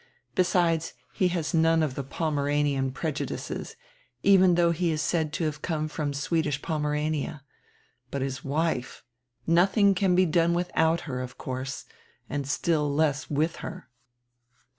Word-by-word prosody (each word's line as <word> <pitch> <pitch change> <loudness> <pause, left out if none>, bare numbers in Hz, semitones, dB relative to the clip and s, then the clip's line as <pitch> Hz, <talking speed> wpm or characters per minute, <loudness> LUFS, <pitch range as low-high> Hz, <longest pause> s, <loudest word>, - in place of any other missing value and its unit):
Besides, 170 -3 +1 0.2
he 185 - +2
has 170 -4 -2
none 165 0 +4
of 145 -4 -1
die 140 - -3
Pomeranian 145 -2 0
preju 155 +2 -3
dices, - - -5 0.5
even 190 -2 +6
though 170 -1 +4
he 170 +1 0
is 155 -1 0
said 160 -1 0
to 165 - -2
have 150 -2 -2
come 155 -3 -1
from 150 -1 -3
Swedish 145 +1 -1
Pomerania. 150 -1 -2 0.7
But 140 0 -2
his 135 -1 -4
wife! 145 -3 -2 0.4
Nothing 195 +4 +4
can 185 -1 +2
be 185 +1 +5
done 170 +1 +2
without 170 -1 +1
her, 130 -4 -4
of 125 -1 -7
course, 130 +1 -5 0.4
and 140 -1 -3
still 150 0 +1
less 145 -1 0
with 155 +3 0
her." - - -8
155 Hz, 145 wpm, -27 LUFS, 145-170 Hz, 0.7 s, even